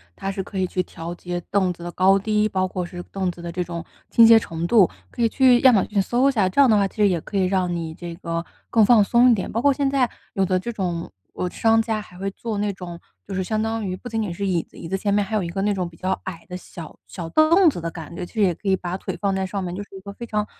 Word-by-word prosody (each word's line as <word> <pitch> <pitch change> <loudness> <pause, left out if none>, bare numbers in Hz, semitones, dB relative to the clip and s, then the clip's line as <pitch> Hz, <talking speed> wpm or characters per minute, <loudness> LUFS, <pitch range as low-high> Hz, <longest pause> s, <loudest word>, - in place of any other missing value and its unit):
它 195 0 -3
是 195 - -3
可 190 - -8
以 185 - +1
去 185 0 -1
调 170 0 -7
节 175 0 -5
凳 190 -3 +2
子 170 - -12
的 175 - -5
高 190 +2 +4
低， 210 +1 +1
包 190 -3 0
括 180 -1 -4
是 175 0 -8
凳 190 -1 -3
子 170 - -12
的 170 0 -5
这 180 +1 -3
种 170 -1 -6 0.3
倾 230 - +7
斜 225 0 +8
程 165 -5 -5
度， 200 -1 +5 0.2
可 - - -5
以 230 - +5
去 250 +1 +4
亚 260 -2 +7
马 200 - +4
逊 205 -2 0
搜 245 +7 +2
一 - - +2
下， 210 -7 +2
这 185 +10 +3
样 270 - +6
的 215 - +5
话 200 -1 +3
其 - - -18
实 210 -1 +4
也 175 -3 0
可 205 - -9
以 190 -1 +3
让 185 -1 0
你 165 -2 -4
这 170 0 -8
个 170 -1 -4 0.2
更 225 -2 +5
放 225 -1 +6
松 240 +4 +5
一 - - +5
点。 195 - -4
包 230 - -1
括 285 +1 +4
现 280 0 0
在 270 -3 +2 0.2
有 195 -3 +1
的 185 0 +1
这 215 +6 -4
种， 175 -6 -3 0.2
呃， 180 - -2
商 225 +2 +3
家 220 -1 -2
还 180 -3 -14
会 195 +1 -3
做 220 +1 -5
那 205 0 0
种 175 -3 -8 0.3
就 195 - -6
是 190 - 0
相 215 +3 -1
当 225 0 -2
于 185 -1 -2
不 245 - -9
仅 225 -1 -1
仅 200 -5 -3
是 200 +3 -3
椅 175 -3 +1
子， - - -20
椅 165 - -7
子 190 - 0
前 200 +1 0
面 205 0 +3
还 200 +2 -4
有 210 - +1
一 - - -3
个 195 +2 -3
那 205 +1 +1
种 185 -3 -2
比 170 - -14
较 185 +3 -2
矮 170 -3 -7
的 180 - -5
小 170 -3 -11
小 170 -3 -7
凳 325 - +5
子 270 - -4
的 165 0 -3
感 165 -2 -9
觉， 175 - -4
其 - - -16
实 220 - -1
也 185 -3 +4
可 - - -9
以 190 - +4
把 180 0 -4
腿 - - -5
放 200 -1 +1
在 190 0 -1
上 195 +1 -4
面， 175 -1 -4
就 195 - -5
是 200 - -15
一 190 - -7
个 200 +1 -8
非 235 +4 -8
常 210 -2 -1
195 Hz, 340 characters per minute, -23 LUFS, 180-220 Hz, 0.3 s, 斜